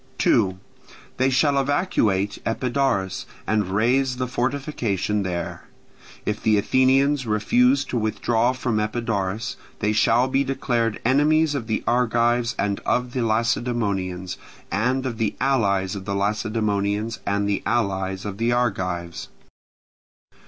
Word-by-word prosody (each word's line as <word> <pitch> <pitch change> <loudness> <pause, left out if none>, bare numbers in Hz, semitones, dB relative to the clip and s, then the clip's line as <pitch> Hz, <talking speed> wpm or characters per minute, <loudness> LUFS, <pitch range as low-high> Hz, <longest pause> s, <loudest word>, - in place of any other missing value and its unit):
2. 95 -4 +2 0.6
They 130 +1 +3
shall 140 +2 +3
evacuate 115 - +1
Epidaurus, 120 -5 -1 0.2
and 105 -3 +1
raze 125 +6 +1
the 130 - -1
fortification 125 - -1
there. 90 -3 -4 0.6
If 105 0 -2
the 110 -1 +3
Athenians 130 +4 +3
refuse 245 - +3
to 120 - -2
withdraw 115 +2 +1
from 125 -4 -1
Epidaurus, 110 -2 -2 0.2
they 105 - 0
shall 115 +3 +3
be 135 +1 +1
declared 120 -5 -1
enemies 150 +4 +3
of 130 -6 -3
the 110 - -1
Argives 120 0 +2
and 100 0 -1
of 125 0 -1
the 130 - -1
Lacedaemonians, 110 -5 -1 0.3
and 125 +6 0
of 120 -3 -4
the 110 -2 0
allies 100 -8 +1
of 95 -1 -7
the 100 -1 -2
Lacedaemonians 105 +1 -1
and 100 0 +1
the 100 -1 0
allies 95 -4 -1
of 100 0 -5
the 115 +1 +1
Argives. 90 -8 -1
115 Hz, 125 wpm, -23 LUFS, 100-130 Hz, 0.6 s, They